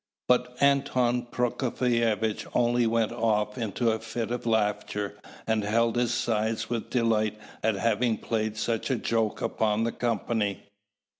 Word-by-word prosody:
But 125 0 +2
Anton 125 -3 +2
Prokofievitch 115 -3 0
only 120 -1 +3
went 115 -1 +1
off 105 -3 0
into 115 0 0
a 110 - -1
fit 115 +1 -4
of 120 -1 -3
laughter, 105 -2 0 0.3
and 110 -1 +1
held 115 +3 +2
his 120 -1 +1
sides 115 -2 -1
with 115 -2 -2
delight 110 -3 +1 0.2
at 110 -1 +1
having 115 +2 +1
played 110 -1 -2
such 115 +2 -1
a 130 - +2
joke 115 -2 -1
upon 110 0 +1
the 115 - 0
company. 110 -4 -1
115 Hz, 140 wpm, -27 LUFS, 110-120 Hz, 0.3 s, only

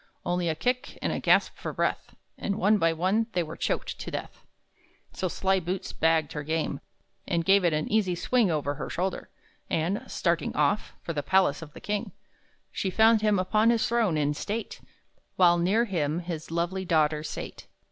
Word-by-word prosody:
Only 175 -1 0
a 160 - 0
kick, 250 +10 -2
and - - -1
a - - -2
gasp - - +3
for - - -5
breath, - - -2 0.2
And, 200 - -2
one 210 +1 +3
by 165 -2 +3
one, 190 +7 +1
they 175 - +1
were 160 0 -7
choked - - -2
to - - -5
death. - - -7 0.7
So 185 - -2
Sly 190 +2 +1
Boots 180 +2 -4
bagged 160 -2 +2
her 150 - -3
game, 155 -2 -2 0.5
And 170 -3 0
gave 195 0 +5
it 175 - +3
an 155 0 -1
easy 205 -5 +1
swing 235 +3 +2
Over 145 -3 -1
her - - -6
shoulder; 185 +1 -3 0.4
and, 170 +6 0
starting 170 -1 -1
off 150 +8 +1
For 165 - -3
the 145 - -1
palace 185 -2 +2
of 155 -2 -10
the - - -10
king, 210 -1 -3 0.6
She 190 - -2
found 220 +3 +5
him 210 -1 +3
upon 215 +5 +3
his 235 -1 +2
throne, 225 -9 +1
in 145 -1 +1
state, 210 +9 -5 0.5
While 175 -2 +5
near 200 +7 +2
him 160 -7 -1
his 170 -3 -6
lovely 175 +3 -1
daughter 155 -3 +2
sate. 155 - -7
175 Hz, 190 wpm, -27 LUFS, 160-205 Hz, 0.7 s, gave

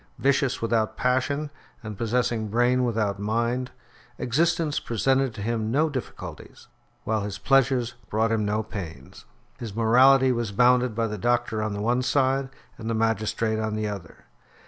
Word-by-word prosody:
Vicious 135 -3 +1
without 115 -1 0
passion, 135 +4 0 0.3
and 110 -1 -6
possessing 115 0 -1
brain 120 +4 +2
without 110 -5 -1
mind, 120 +4 -1 0.5
existence 160 +4 +1
presented 130 +3 +1
to 110 -3 -7
him 110 -1 -1
no 150 +7 +2
difficulties, 130 -3 -8 0.4
while 110 -1 0
his 100 0 -4
pleasures 130 0 +2 0.2
brought 110 +1 +1
him 110 -1 +1
no 105 +1 0
pains. 80 -11 -9 0.3
His 110 -4 -6
morality 130 +4 +5
was 120 -4 -2
bounded 125 +1 +3
by 115 0 0
the 105 -2 -4
doctor 120 0 0
on 110 -1 -2
the 100 - -4
one 120 +3 +1
side, 135 +1 +1 0.3
and 110 0 -5
the 115 - 0
magistrate 110 0 0
on 110 -1 -2
the 110 0 -2
other. 100 -6 -8
115 Hz, 155 wpm, -25 LUFS, 110-125 Hz, 0.5 s, morality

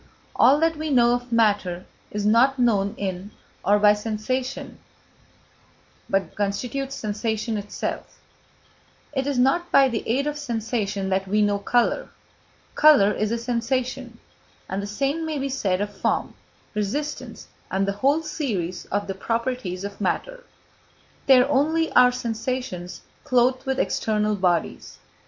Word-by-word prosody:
All 275 +4 +5
that 325 -1 +2
we 310 0 -3
know 240 -3 +4
of 245 0 -3
matter 205 -6 +1 0.2
is 205 0 -3
not 240 +6 +4
known 205 -5 +1
in 190 0 -4 0.3
or 205 +1 +4
by 210 0 +6
sensation, 225 +5 -4 1.3
but 195 -3 0
constitutes 250 +7 -2
sensation 220 0 -2
itself; 205 0 -5 0.9
it 270 -1 -1
is 285 -2 -1
not 310 +8 +2
by 275 -1 +6
the 230 -3 -2
aid 265 +5 +1
of 295 0 -3
sensation 220 -6 -2
that 190 0 0
we 210 +2 +2
know 205 -1 +1
colour; 245 - +1 0.6
colour 290 -10 +6
is 215 +1 -1
a 235 - 0
sensation, 245 +1 -2 0.5
and 190 +1 -3
the 200 - -5
same 275 +9 -1
may 315 -2 -3
be 275 0 -2
said 195 -8 -1
of 205 0 -4
form, 195 - -1 0.4
resistance, 225 +9 -4 0.2
and 195 +1 0
the - - +1
whole 290 +4 +3
series 195 - -3
of 205 +1 -2
the 195 - -4
properties 230 -2 -3
of 200 +1 -7
matter. - - -2 0.8
They 265 -2 +8
are 250 - +3
only 310 +4 +1
our 250 0 +6
sensations 230 -6 -4 0.2
clothed 255 +1 +2
with 265 0 0
external 215 -4 0
bodies. 180 -4 -1
230 Hz, 140 wpm, -24 LUFS, 205-265 Hz, 1.3 s, They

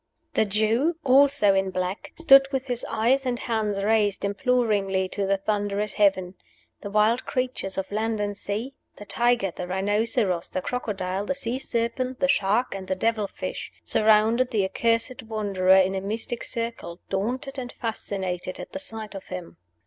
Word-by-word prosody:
The - - +3
Jew, 220 - +1
also 275 -5 +5
a 195 - +3
black, 185 +1 -3
stood 275 -4 +7
with 265 -1 -1
his 245 -2 -2
eyes 255 +5 +2
and 250 -2 -1
hands 215 -4 -1
raised 210 -2 +2
imploringly 200 -4 +1
to 200 0 -2
the 195 0 +2
thunderous 205 0 -1
heaven. 190 -3 +2 0.5
The 200 - -7
wild 215 +4 +2
creatures 250 -7 -2
of 190 0 -3
land 220 +1 -1
and 205 0 -2
sea 215 +7 -4 0.2
the 205 - -9
tiger, 235 -1 +1
the 180 - -5
rhinoceros, 200 -1 0
the 185 - -3
crocodile, 195 -5 -3
the 275 - 0
sea 255 -2 -3
serpent, 250 +1 -2
the 275 - +2
shark, 220 0 +2
and 190 -1 -6
the 190 - 0
devil 220 +1 0
fish - - -6
surrounded 220 +3 +3
the 205 -4 +1
accursed 230 +5 0
Wanderer 200 -4 +2
in 190 0 +3
a 190 - -2
mystic 225 +4 -2
circle, 230 -8 -4
daunted 255 +8 -2
and 245 -1 -6
fascinated 190 -5 -4
at - - -8
the 285 - -5
sight 225 -7 -7
of 195 - -8
him. 180 -2 -7
215 Hz, 165 wpm, -25 LUFS, 195-245 Hz, 0.5 s, stood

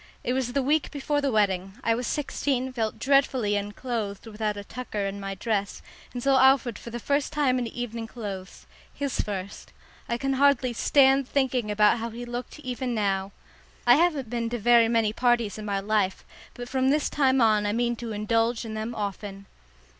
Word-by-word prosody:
It 250 - 0
was 255 -2 -1
the 275 - +1
week 295 +3 +1
before 290 0 -1
the 280 -1 0
wedding. 195 -3 +1
I 230 - +3
was 245 +2 -2
sixteen, 270 -3 -1
felt 225 -3 -2
dreadfully 265 -6 +2
unclothed 205 0 -4
without 210 -1 -3
a 205 - -6
tucker 215 -2 -4
in 195 +1 -4
my 195 0 -5
dress, 200 0 -2 0.3
and 245 -1 -6
saw 270 -1 +4
Alfred 265 -4 +4
for - - -9
the 240 +1 -5
first 280 +4 0
time 265 -4 +1
in 240 - -2
evening 230 -1 -5
clothes 200 -5 -7 0.3
his 280 -3 -3
first. 200 -1 -6 0.4
I 235 - 0
can 270 +2 -1
hardly 265 -2 +3
stand 270 +2 +4
thinking 255 -5 0
about 210 +2 +4
how 230 +1 -3
he 235 +2 -7
looked 240 +3 -6
even 255 -2 -3
now. 195 -2 0 0.5
I 240 - +8
haven't 300 -3 +2
been 235 -1 -1
to 240 - -2
very 235 +1 +5
many 225 -2 +1
parties 235 -4 +1
in 215 - -6
my 200 -1 -1
life, 200 -2 0 0.3
but 245 0 -7
from 260 +1 +1
this 295 +1 +2
time 270 -2 +2
on 215 -3 +3
I - - +1
mean 240 +2 0
to 235 -1 -6
indulge 225 +3 0
in 220 - -6
them 220 +2 -4
often. 200 -1 -5
235 Hz, 190 wpm, -26 LUFS, 210-260 Hz, 0.5 s, I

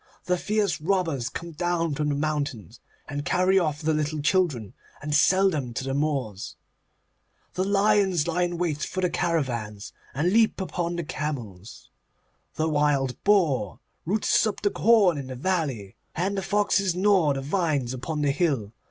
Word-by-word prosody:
The 180 - +2
fierce 210 -5 0
robbers 165 -8 0
come 170 0 -7
down 165 0 -1
from 150 +1 -1
the 145 - 0
mountains, 145 - -3 0.3
and 145 0 -4
carry 185 +3 +3
off 155 -3 -2
the 160 +1 +2
little 150 0 -1
children, 145 - 0 0.3
and 150 +1 -4
sell 185 +7 +4
them 130 -7 -4
to 135 - -2
the 135 0 -3
Moors. 135 -9 -2 1.0
The 185 - -1
lions 200 -4 +2
lie 170 +1 0
in 175 -1 -1
wait 165 -4 -1
for 185 - -3
the 180 -1 +1
caravans, 125 -12 -2 0.2
and 165 +7 +1
leap 225 -2 +3
upon 175 -2 -3
the 170 - -3
camels. 120 - -6 0.6
The 155 - 0
wild 145 -4 0
boar 150 - +2 0.3
roots 210 +3 +2
up 215 - -4
the 205 - +2
corn 200 -9 +4
in 135 - -6
the 130 - -6
valley, 135 - -2 0.2
and 190 +4 -1
the 195 - -1
foxes 200 -1 +1
gnaw 185 -6 +3
the 135 - -3
vines 145 -5 -1
upon 150 +4 -3
the 145 - +2
hill. 135 - -1
155 Hz, 165 wpm, -25 LUFS, 140-185 Hz, 1.0 s, sell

